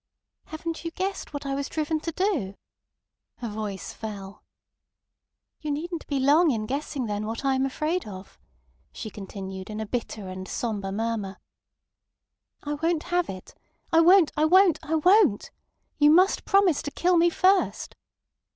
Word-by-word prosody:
"Haven't 325 Hz, +1 st, -6 dB
you 335 Hz, -, -3 dB
guessed 380 Hz, +3 st, -4 dB
what 285 Hz, -1 st, -6 dB
I 275 Hz, -, -2 dB
was 280 Hz, +1 st, -3 dB
driven 315 Hz, 0 st, -1 dB
to 330 Hz, -, -4 dB
do!" 315 Hz, -, -1 dB, 0.8 s
Her 240 Hz, -, -6 dB
voice 210 Hz, -3 st, -5 dB
fell. 200 Hz, -3 st, -8 dB, 1.2 s
"You 305 Hz, -, -5 dB
needn't 325 Hz, +3 st, -4 dB
be 280 Hz, -2 st, -1 dB
long 300 Hz, +6 st, +5 dB
in 220 Hz, -5 st, -1 dB
guessing 275 Hz, +1 st, -3 dB
then 210 Hz, 0 st, -3 dB
what 230 Hz, +5 st, -5 dB
I 270 Hz, -, +3 dB
am 265 Hz, +1 st, +1 dB
afraid 310 Hz, +5 st, -2 dB
of," 190 Hz, -1 st, -10 dB, 0.5 s
she 215 Hz, -, -7 dB
continued, 190 Hz, -1 st, -8 dB
in 215 Hz, 0 st, -5 dB
a 220 Hz, -, -3 dB
bitter 215 Hz, -3 st, -4 dB
and 185 Hz, 0 st, -7 dB
sombre 205 Hz, -4 st, -3 dB
murmur. 210 Hz, -2 st, -3 dB, 1.3 s
"I 295 Hz, -, -3 dB
won't 325 Hz, +2 st, 0 dB
have 355 Hz, -1 st, +1 dB
it. 185 Hz, -1 st, -8 dB, 0.4 s
I 325 Hz, -, +6 dB
won't. 350 Hz, 0 st, +6 dB
I 305 Hz, -, +2 dB
won't. 365 Hz, 0 st, +5 dB
I 315 Hz, 0 st, -2 dB
won't. 355 Hz, -, +4 dB, 0.5 s
You 295 Hz, 0 st, +6 dB
must 365 Hz, +5 st, +4 dB
promise 390 Hz, -6 st, +3 dB
to -, -, -4 dB
kill 355 Hz, +5 st, +1 dB
me 340 Hz, 0 st, +5 dB
first!" 375 Hz, +3 st, +1 dB
285 Hz, 160 wpm, -26 LUFS, 215-335 Hz, 1.3 s, I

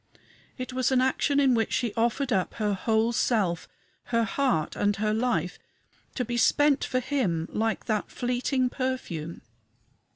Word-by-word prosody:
It 255 Hz, -1 st, -5 dB
was 255 Hz, 0 st, +1 dB
an 260 Hz, -, +4 dB
action 265 Hz, +2 st, +2 dB
in 270 Hz, -2 st, +4 dB
which 225 Hz, -2 st, +1 dB
she 235 Hz, -4 st, 0 dB
offered 240 Hz, +3 st, 0 dB
up 190 Hz, -3 st, 0 dB
her 210 Hz, -2 st, 0 dB
whole 220 Hz, +3 st, +1 dB
self 200 Hz, -8 st, 0 dB, 0.4 s
her 230 Hz, -1 st, +1 dB
heart 240 Hz, -, 0 dB
and 205 Hz, 0 st, +1 dB
her 215 Hz, +1 st, 0 dB
life 220 Hz, -7 st, -1 dB, 0.6 s
to 250 Hz, -, -1 dB
be 240 Hz, +1 st, -3 dB
spent 290 Hz, +4 st, +3 dB
for 255 Hz, -, 0 dB
him, 230 Hz, -, -1 dB
like 225 Hz, 0 st, -1 dB
that 215 Hz, -3 st, -1 dB
fleeting 250 Hz, +1 st, -1 dB
perfume. 185 Hz, -, -4 dB
235 Hz, 155 wpm, -27 LUFS, 210-255 Hz, 0.6 s, an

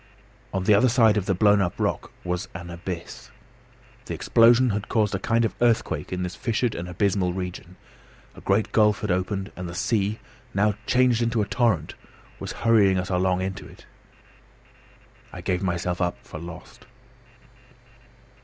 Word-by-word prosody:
On 95 Hz, -1 st, -2 dB
the 105 Hz, -, +4 dB
other 110 Hz, +5 st, +5 dB
side 115 Hz, -3 st, +4 dB
of 100 Hz, -3 st, -1 dB
the 95 Hz, -, +2 dB
blown 105 Hz, +1 st, +4 dB
up 90 Hz, -2 st, -2 dB
rock -, -, -1 dB
was 90 Hz, +2 st, -3 dB
an 85 Hz, 0 st, -7 dB
abyss. 85 Hz, 0 st, -7 dB, 0.8 s
The -, -, -4 dB
explosion 120 Hz, +2 st, +4 dB
had 105 Hz, 0 st, -3 dB
caused 105 Hz, -3 st, +1 dB
a 95 Hz, -, -1 dB
kind 115 Hz, +3 st, +1 dB
of -, -, -2 dB
earthquake 120 Hz, -2 st, +1 dB
in 90 Hz, 0 st, -2 dB
this 90 Hz, -1 st, -4 dB
fissured 115 Hz, 0 st, -1 dB
and 85 Hz, +1 st, -6 dB
abysmal 90 Hz, 0 st, 0 dB
region; 90 Hz, -1 st, -6 dB, 0.6 s
a -, -, -13 dB
great 100 Hz, +2 st, +1 dB
gulf 105 Hz, +1 st, +3 dB
had 105 Hz, -4 st, -1 dB
opened; 95 Hz, +2 st, -2 dB
and 90 Hz, -1 st, -6 dB
the 85 Hz, -, -8 dB
sea, 105 Hz, +1 st, 0 dB, 0.4 s
now 105 Hz, +1 st, +3 dB
changed 125 Hz, -2 st, +3 dB
into 115 Hz, -2 st, +1 dB
a -, -, -2 dB
torrent, 105 Hz, -, 0 dB, 0.5 s
was -, -, -5 dB
hurrying 105 Hz, -5 st, +5 dB
us 90 Hz, +1 st, -3 dB
along 90 Hz, 0 st, +1 dB
into 95 Hz, +1 st, -5 dB
it. -, -, -16 dB, 1.5 s
I -, -, -8 dB
gave 90 Hz, -1 st, -1 dB
myself 90 Hz, -1 st, -2 dB
up 90 Hz, 0 st, 0 dB
for 80 Hz, -, -8 dB
lost. 85 Hz, +1 st, -11 dB
95 Hz, 165 wpm, -25 LUFS, 90-110 Hz, 1.5 s, other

